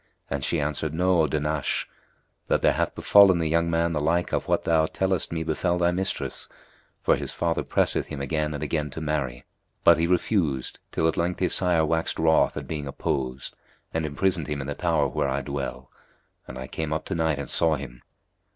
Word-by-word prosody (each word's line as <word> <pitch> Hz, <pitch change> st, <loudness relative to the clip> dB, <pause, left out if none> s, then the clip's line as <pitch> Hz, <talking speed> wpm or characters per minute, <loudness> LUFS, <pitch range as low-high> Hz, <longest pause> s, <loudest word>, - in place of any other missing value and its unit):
and 70 Hz, -1 st, -2 dB
she 85 Hz, -, 0 dB
answered, 75 Hz, +1 st, -2 dB
"Know, 90 Hz, 0 st, +3 dB
O 80 Hz, -, +2 dB
Dahnash, 75 Hz, 0 st, -1 dB, 0.6 s
that -, -, +1 dB
there -, -, +5 dB
hath -, -, -1 dB
befallen 100 Hz, -3 st, +6 dB
the 80 Hz, -1 st, 0 dB
young 85 Hz, +1 st, +1 dB
man 85 Hz, 0 st, +1 dB
the 75 Hz, -, -1 dB
like 85 Hz, +4 st, 0 dB
of -, -, -1 dB
what -, -, +1 dB
thou 80 Hz, -1 st, +3 dB
tellest 95 Hz, -1 st, -1 dB
me 80 Hz, -1 st, -2 dB
befel 85 Hz, +3 st, 0 dB
thy 85 Hz, 0 st, +2 dB
mistress; 95 Hz, +2 st, -3 dB, 0.5 s
for -, -, +4 dB
his -, -, -4 dB
father 85 Hz, -1 st, 0 dB
pressed -, -, +1 dB
him 75 Hz, -, -3 dB
again 75 Hz, +2 st, -1 dB
and 70 Hz, -, -4 dB
again 75 Hz, -2 st, -1 dB
to 75 Hz, -, -7 dB
marry, 70 Hz, -6 st, -2 dB, 0.4 s
but 85 Hz, -1 st, +6 dB
he 85 Hz, -, +2 dB
refused, 85 Hz, -, 0 dB
till 80 Hz, -, +1 dB
at 80 Hz, -, 0 dB
length 90 Hz, +1 st, -1 dB
his 90 Hz, -2 st, +3 dB
sire 85 Hz, -4 st, +3 dB
waxed 80 Hz, +1 st, 0 dB
wroth 80 Hz, 0 st, +3 dB
at -, -, -5 dB
being 75 Hz, -3 st, -4 dB
opposed 65 Hz, -2 st, -3 dB, 0.4 s
and 80 Hz, -, -1 dB
imprisoned 80 Hz, +2 st, 0 dB
him 75 Hz, -1 st, -3 dB
in 70 Hz, -, -4 dB
the 70 Hz, -, -3 dB
tower -, -, +1 dB
where 70 Hz, -, -1 dB
I 70 Hz, +1 st, -1 dB
dwell: 65 Hz, -2 st, -5 dB, 0.6 s
and 65 Hz, -, -8 dB
I 65 Hz, -, -5 dB
came 80 Hz, +3 st, -4 dB
up 80 Hz, 0 st, -2 dB
to -, -, -4 dB
night 80 Hz, -3 st, +1 dB
and 70 Hz, -, -5 dB
saw 80 Hz, -1 st, +2 dB
him." 65 Hz, -4 st, -8 dB
80 Hz, 205 wpm, -25 LUFS, 70-85 Hz, 0.6 s, befallen